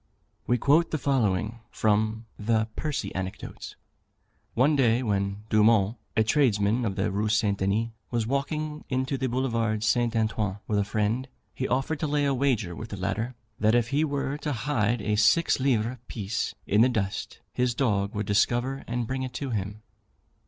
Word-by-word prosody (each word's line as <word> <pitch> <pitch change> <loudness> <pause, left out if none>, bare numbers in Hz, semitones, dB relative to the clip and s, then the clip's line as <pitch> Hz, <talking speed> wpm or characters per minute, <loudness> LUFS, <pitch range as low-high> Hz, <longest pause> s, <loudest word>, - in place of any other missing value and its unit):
We 120 - +3
quote 150 +7 +3
the 155 - -1
following 115 -5 0
from 110 +1 +1
the 110 +1 +1
"Percy 150 -2 -3
Anecdotes:" 95 +2 -6 0.8
"One 135 +6 +4
day, 125 -2 +3
when 100 -1 -1
Dumont, 110 0 +4 0.2
a 110 - +5
tradesman 110 -2 +2
of 100 -3 -1
the - - 0
Rue 105 +2 0
St. 105 -2 +1
Denis, 105 +4 +1 0.2
was 120 -2 0
walking 150 +4 -2
in 130 0 +1
the 130 0 -2
Boulevard 115 -4 0
St. 120 +1 +2
Antoine 110 -3 0
with 105 -1 0
a - - +3
friend, 110 +5 -1 0.3
he 130 - -2
offered 135 +4 0
to 155 - -1
lay 145 0 +1
a 140 - +2
wager 120 -10 0
with 110 +5 -7
the 100 - -6
latter, 100 +7 -2 0.2
that 110 +2 +4
if 120 -1 +2
he 145 +3 +2
were 140 -1 -2
to 150 -1 -2
hide 115 -3 0
a 105 - +1
six 110 +12 +4
livre 125 -2 +1
piece 105 -1 -3
in 105 +2 +3
the 125 - +6
dust, 100 -6 -3
his 125 -1 +1
dog 105 -6 0
would 105 0 -1
discover 120 +6 +1
and 120 0 -1
bring 130 +3 -3
it 130 -1 -4
to 135 +1 -4
him. 105 0 -3
115 Hz, 175 wpm, -27 LUFS, 105-130 Hz, 0.8 s, the